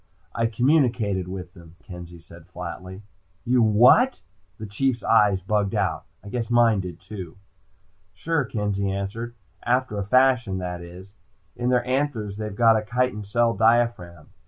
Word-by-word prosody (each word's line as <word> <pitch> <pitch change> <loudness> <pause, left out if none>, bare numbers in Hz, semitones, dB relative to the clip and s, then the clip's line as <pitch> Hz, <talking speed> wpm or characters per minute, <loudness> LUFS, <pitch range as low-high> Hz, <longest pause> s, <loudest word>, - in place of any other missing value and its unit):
"I 115 0 0
communicated 115 - +1
with 90 -1 -7
them," 85 -3 -16
Kenzie 85 -2 -10
said 85 0 -16
flatly. 95 +2 -8 0.4
"You 125 0 +3
what?" 120 - +5 0.4
The 110 - -7
Chief's 120 +4 -1
eyes 105 -4 +3
bugged 100 +1 -1
out. - - -1 0.2
I 100 - -10
guess 115 +1 -3
mine 120 -3 +4
did 90 -2 -6
too. 95 -5 -9 0.8
"Sure," 160 +9 -1
Kenzie 105 -4 -2
answered. 100 +5 -4 0.3
"After 125 -3 0
a - - -1
fashion, 125 -2 +2
that 90 -1 -5
is. 90 +3 -12 0.4
In 120 0 -2
their 125 -1 +2
anthers 125 -6 -2
they've 105 -2 -5
got 115 0 +5
a 110 - -2
chitin 125 -1 -1
cell 115 +3 +1
diaphragm. 110 -7 +1
105 Hz, 150 wpm, -24 LUFS, 95-120 Hz, 0.8 s, what